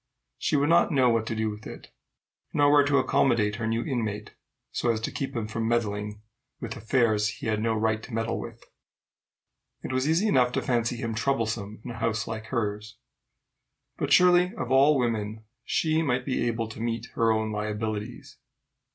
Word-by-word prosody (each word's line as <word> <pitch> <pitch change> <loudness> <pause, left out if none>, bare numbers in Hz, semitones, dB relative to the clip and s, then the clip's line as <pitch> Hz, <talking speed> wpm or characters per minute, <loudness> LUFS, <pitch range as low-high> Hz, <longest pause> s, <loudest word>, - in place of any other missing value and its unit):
She - - 0
would 145 +1 +2
not 170 +1 +4
know 130 -4 +4
what 115 -1 0
to 115 - -2
do 110 0 -1
with 105 +1 -9
it, - - -11 0.6
nor 145 0 +4
where 145 -1 +6
to 140 -1 +3
accommodate 115 -5 +2
her 115 -1 -2
new 115 +1 0
inmate 110 -6 -3 0.4
so 120 - -1
as 110 - -1
to - - -3
keep 135 -2 -4
him 115 -2 -2
from 110 +1 -2
meddling 105 -2 -2 0.4
with 115 -2 -5
affairs 110 -2 +1
he - - -6
had 110 -1 0
no 115 0 +1
right 110 0 0
to 125 - -11
meddle 115 0 -2
with: - - -9 1.2
it - - -4
was 130 +3 +1
easy 175 +7 +2
enough 125 -8 +3
to - - 0
fancy 120 -1 0
him 115 -1 -3
troublesome 110 -4 -2
in 125 - -5
a 110 - -8
house 110 -1 0
like 110 -1 -5
hers. 110 -1 -3 1.0
But - - -2
surely 180 0 +5
of 125 0 -4
all 140 +3 +5
women 110 -3 -2 0.2
she 160 0 +1
might 125 -5 0
be 130 -3 0
able 115 -1 -1
to 110 - -8
meet 115 0 -2
her 115 -1 +2
own 110 0 0
liabilities. 105 0 -4
115 Hz, 185 wpm, -27 LUFS, 110-130 Hz, 1.2 s, where